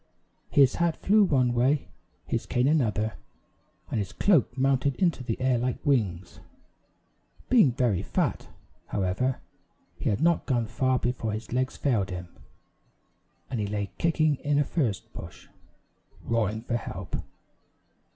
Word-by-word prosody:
His 135 -3 +4
hat 170 -1 +2
flew 210 +2 +4
one 130 -9 +2
way, 130 +4 +1 0.4
his - - -2
cane 125 +2 +1
another, 110 -8 +1 0.7
and - - 0
his 100 -2 -4
cloak 170 - +2
mounted 135 0 +2
into 170 -8 +1
the 115 -2 -3
air 130 -2 +2
like 125 +1 -3
wings. 95 -10 0 1.1
Being 225 - +6
very 120 -7 +1
fat, - - -1 0.4
however, 100 +7 -1 0.6
he - - 0
had 100 - 0
not 170 0 +2
gone 120 -4 +1
far 130 +4 +1
before 120 -3 -2
his 110 +2 -6
legs 130 +1 -1
failed 110 -9 +1
him, 90 -1 -6 1.2
and 125 - -2
he 105 - -1
lay 100 -1 -3
kicking 155 -3 +2
in 145 +1 0
a 145 - +4
furze 125 - -1
bush, - - -11 0.8
roaring 110 -1 -1
for 120 -1 -1
help. - - -5
125 Hz, 140 wpm, -27 LUFS, 110-140 Hz, 1.2 s, Being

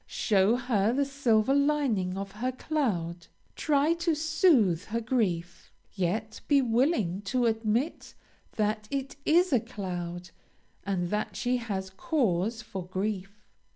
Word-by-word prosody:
Show 205 +1 +2
her 230 -4 +1
the 280 +2 +1
silver 265 -4 +2
lining 275 -11 +1
of 195 0 -5
her 235 +6 -2
cloud, 185 - -2 0.3
try 295 +1 +2
to 335 -1 0
soothe 300 - +3
her 230 +2 -2
grief, 185 -8 -2 0.2
yet 210 +4 -2
be 285 -1 +5
willing 230 - +1
to 250 -1 +1
admit 225 +6 -1 0.4
that 215 0 -1
it 275 -1 -3
is 345 0 +4
a 250 - +5
cloud, 175 -4 -6 0.6
and 180 -3 -1
that 210 0 -2
she 250 +1 0
has 195 -5 -4
cause 220 - 0
for 195 -4 -6
grief. 195 +1 -4
220 Hz, 130 wpm, -28 LUFS, 190-270 Hz, 0.6 s, be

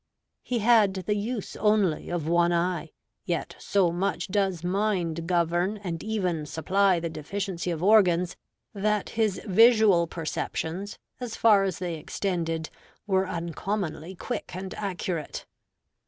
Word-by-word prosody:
He 250 - -2
had 220 -5 +5
the 210 - +1
use 210 +1 -3
only 210 -6 +2
of 175 -3 -2
one 170 +1 +3
eye; 175 +1 0 0.3
yet - - -3
so 190 -4 +2
much 190 +3 -2
does 190 -4 0
mind 180 -4 -1
govern 175 +3 +1
and 170 -3 -4
even 185 -8 -1
supply 185 +4 +2
the 165 - -3
deficiency 175 +4 -4
of 165 -1 -3
organs, 185 -4 +4 0.4
that 210 +1 0
his 220 -4 0
visual 215 -4 +5
perceptions, 165 +3 -4 0.2
as 245 -3 -5
far 205 -4 +5
as 185 -4 -2
they 175 -3 -3
extended, 165 -2 -2 0.3
were 190 -2 +1
uncommonly 170 +1 -3
quick 175 - -5
and 185 0 -5
accurate. 180 -5 -4
185 Hz, 130 wpm, -27 LUFS, 170-205 Hz, 0.4 s, had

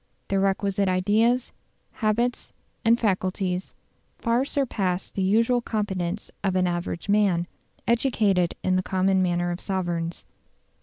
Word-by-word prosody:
The 195 - +2
requisite 195 0 +1
ideas, 215 +7 +2 0.4
habits, 235 +3 -1 0.3
and 230 +1 +5
faculties, 185 -2 -1 0.4
far 235 +2 +1
surpass 200 -11 -1
the 195 - -3
usual 230 +6 +3
competence 200 -4 -3
of 190 -2 +1
an 185 0 +3
average 175 0 -3
man, 200 -4 +3 0.4
educated 215 -7 +2
in 185 0 +2
the - - +2
common 190 0 +1
manner 175 -1 +1
of 175 - -4
sovereigns. 175 -3 -3
195 Hz, 120 wpm, -25 LUFS, 185-220 Hz, 0.4 s, and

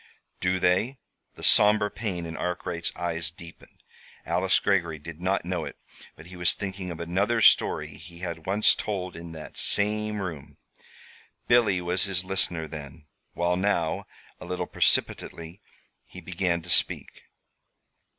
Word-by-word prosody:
"Do 90 0 +1
they?" 95 +10 +1 0.4
The - - -12
somber 105 0 +5
pain 95 -6 -4
in 80 0 -6
Arkwright's 90 -1 -3
eyes 85 -2 -1
deepened. 85 0 -15 0.4
Alice 95 +1 +2
Greggory 85 -5 0
did 80 +2 -10
not 95 0 0
know 90 -2 -2
it, - - -8 0.4
but 80 - -14
he 90 +1 -11
was 90 -1 +3
thinking 95 -2 -5
of 85 - -7
another 95 +7 0
story 110 - +4
he 85 +1 -13
had 85 -2 -6
once 100 +3 +4
told 95 -4 -4
in 85 0 -9
that 80 -1 -10
same 105 +1 +2
room. 85 -8 -7 0.9
Billy 110 -7 +4
was 90 +2 +2
his 95 -2 0
listener 90 -4 0
then, 75 0 -10 0.3
while 85 +1 +1
now 90 -4 0 0.3
A - - -9
little 90 - -3
precipitately 85 +4 0 0.5
he - - -11
began 90 -2 -2
to 90 - -10
speak. 80 - +1
90 Hz, 145 wpm, -26 LUFS, 85-100 Hz, 0.9 s, somber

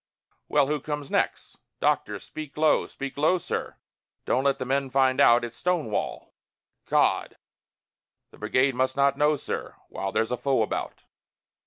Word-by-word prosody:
"Well, 145 -1 +4
who 150 +2 -1
comes 145 -1 -5
next?" - - -1 0.2
"Doctor, - - +1
speak 155 -2 -9
low, 155 0 +3
speak 140 0 -7
low, 160 +5 +4
sir; 170 - -4 0.5
Don't 130 +2 +1
let 140 -1 +3
the 130 - -4
men 135 +1 0
find 130 0 +3
out! 120 +1 +6
It's 120 0 -9
Stonewall!" 160 - -2 0.6
"God!" - - +2 0.9
"The - - -17
brigade 130 +1 +2
must 130 +1 0
not 140 0 +3
know, 150 +1 +3
sir, 140 - -5
While 95 0 -4
there's 115 +2 0
a 125 - 0
foe 135 -4 +1
about!" - - -4
135 Hz, 155 wpm, -26 LUFS, 130-150 Hz, 0.9 s, out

